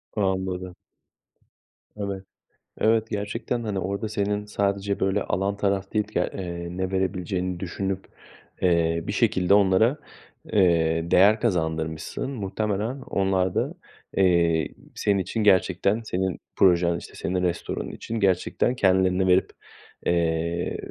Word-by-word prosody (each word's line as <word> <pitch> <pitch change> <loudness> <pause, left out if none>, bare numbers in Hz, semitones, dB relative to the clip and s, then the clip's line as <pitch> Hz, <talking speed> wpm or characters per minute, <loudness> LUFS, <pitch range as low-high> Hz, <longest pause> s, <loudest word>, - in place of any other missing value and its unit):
Anladım. 95 -3 -1 1.2
Evet. 100 -2 -4 0.6
Evet, 110 0 +2
gerçekten, 115 +4 -3
hani, 105 -3 -2
orada 100 +4 -3
senin 105 -1 -1
sadece, 100 -1 -1
böyle, 95 +1 +1
alan 100 +2 -1
taraf 100 -1 -1
değil, 105 -1 +1
ya 90 - +2
eee, 85 -2 -5
ne 95 0 -2
verebileceğini 90 -1 -1
düşünüp, 95 +1 -3 0.6
eee, 85 -2 +2
bir - - -1
şekilde 100 -4 +2
onlara, 100 +7 +4 0.6
eee, 85 -3 +3
değer 105 +4 +6
kazandırmışsın. 80 - -2
Muhtemelen 105 +3 -2
onlar 95 -4 0
da, - - 0 0.4
eee, 85 -4 +3 0.3
senin 100 -2 +1
için, 105 +4 -2
gerçekten 100 +2 +3
senin 95 -4 -2 0.2
projen, 85 -2 +4
işte, - - -11
senin 90 +1 -2
restoranın 90 -1 -2
için 115 0 -5
gerçekten 100 +5 +1
kendilerini 95 -3 +3
verip, 90 +1 +3 0.5
eee, 85 0 0
95 Hz, 120 wpm, -25 LUFS, 90-105 Hz, 1.2 s, değer